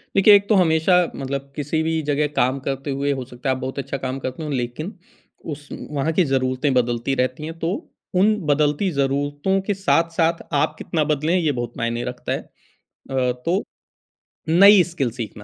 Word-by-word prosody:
देखिए 195 Hz, +2 st, +7 dB
एक 200 Hz, 0 st, +2 dB
तो 215 Hz, -, +5 dB
हमेशा 165 Hz, -1 st, +4 dB, 0.2 s
मतलब 140 Hz, 0 st, -5 dB
किसी 150 Hz, +2 st, -1 dB
भी 160 Hz, 0 st, 0 dB
जगह 150 Hz, 0 st, +1 dB
काम 130 Hz, +2 st, +2 dB
करते 135 Hz, +1 st, -2 dB
हुए 140 Hz, +1 st, 0 dB
हो 130 Hz, -2 st, -4 dB
सकता 125 Hz, +1 st, -5 dB
है 130 Hz, -, +2 dB
आप 130 Hz, -, -8 dB
बहुत 130 Hz, +2 st, -4 dB
अच्छा 140 Hz, 0 st, -4 dB
काम 130 Hz, +1 st, -3 dB
करते 130 Hz, +4 st, -5 dB
हो 150 Hz, -, -4 dB
लेक़िन 130 Hz, -, -3 dB, 0.6 s
उस 145 Hz, 0 st, -11 dB, 0.2 s
वहाँ 150 Hz, +2 st, 0 dB
की 185 Hz, -, +3 dB
ज़रूरतें 130 Hz, 0 st, 0 dB
बदलती 120 Hz, +1 st, 0 dB
रहती 130 Hz, +3 st, -1 dB
हैं 165 Hz, +1 st, -7 dB
तो 165 Hz, -, -1 dB, 0.5 s
उन 215 Hz, +3 st, +4 dB
बदलती 150 Hz, +5 st, +2 dB
ज़रूरतों 145 Hz, +6 st, 0 dB
के 205 Hz, -, +2 dB
साथ-साथ 165 Hz, -3 st, +1 dB
आप 145 Hz, -, +1 dB
कितना 160 Hz, -2 st, -1 dB
बदले 150 Hz, +3 st, 0 dB
हैं 185 Hz, -, +3 dB
ये 160 Hz, -4 st, +1 dB
बहुत 120 Hz, -3 st, -4 dB
मायने 120 Hz, 0 st, -2 dB
रखता -, -, -5 dB
है। -, -, 0 dB, 0.5 s
अ, 130 Hz, -2 st, -2 dB
तो 185 Hz, +5 st, +1 dB, 0.9 s
नई 195 Hz, +3 st, +8 dB
स्किल 135 Hz, -9 st, -2 dB
सीखना 110 Hz, -3 st, -7 dB
145 Hz, 185 wpm, -22 LUFS, 130-165 Hz, 0.9 s, नई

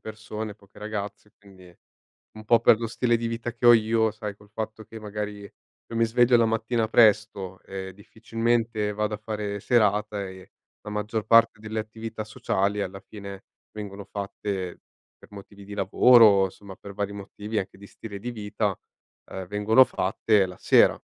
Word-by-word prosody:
persone, 110 Hz, -1 st, -7 dB
poche 100 Hz, -2 st, -20 dB
ragazze, 105 Hz, -1 st, -6 dB
quindi 95 Hz, -3 st, -17 dB, 0.6 s
un 110 Hz, -, -10 dB
po' 115 Hz, +1 st, +4 dB
per 115 Hz, -1 st, +5 dB
lo 115 Hz, -, -3 dB
stile 120 Hz, +1 st, +1 dB
di 115 Hz, 0 st, -3 dB
vita 115 Hz, +1 st, -4 dB
che 120 Hz, 0 st, -1 dB
ho 120 Hz, -, +10 dB
io, 110 Hz, 0 st, +2 dB
sai 105 Hz, -1 st, -6 dB
col 105 Hz, 0 st, -20 dB
fatto 110 Hz, 0 st, -5 dB
che 110 Hz, +1 st, -11 dB
magari 105 Hz, -1 st, -5 dB
io 110 Hz, +3 st, -13 dB
mi 115 Hz, -, +4 dB
sveglio 120 Hz, +2 st, +4 dB
la 115 Hz, -1 st, +4 dB
mattina 115 Hz, +1 st, 0 dB
presto, 105 Hz, -4 st, +3 dB
ehm, 95 Hz, 0 st, -6 dB
difficilmente 115 Hz, +2 st, -2 dB
vado 105 Hz, +1 st, -2 dB
a -, -, -5 dB
fare 105 Hz, -1 st, -4 dB
serata 105 Hz, -3 st, +1 dB
e 95 Hz, 0 st, -13 dB, 0.3 s
la 105 Hz, -, -8 dB
maggior 105 Hz, +1 st, -3 dB
parte 115 Hz, -1 st, +5 dB
delle 110 Hz, 0 st, -3 dB
attività 110 Hz, 0 st, -7 dB
sociali, 105 Hz, -1 st, -1 dB
alla 95 Hz, 0 st, -6 dB
fine, 100 Hz, -2 st, -10 dB, 0.3 s
vengono 100 Hz, -1 st, -7 dB
fatte 100 Hz, -2 st, -5 dB, 0.4 s
per -, -, -18 dB
motivi 100 Hz, 0 st, -12 dB
di 100 Hz, +1 st, -8 dB
lavoro, 100 Hz, 0 st, +6 dB
somma 100 Hz, 0 st, -12 dB
per 100 Hz, -1 st, -11 dB
vari 100 Hz, 0 st, -2 dB
motivi 105 Hz, +2 st, -5 dB
anche 95 Hz, -1 st, -5 dB
di 100 Hz, 0 st, -13 dB
stile 100 Hz, -3 st, -9 dB
di 120 Hz, +4 st, -4 dB
vita, 105 Hz, -3 st, -2 dB, 0.5 s
ehm, 95 Hz, -1 st, -6 dB
vengono 105 Hz, +5 st, +5 dB
fatte 100 Hz, -1 st, +1 dB
la 90 Hz, -1 st, -10 dB
sera. -, -, +5 dB
105 Hz, 170 wpm, -25 LUFS, 100-110 Hz, 0.6 s, ho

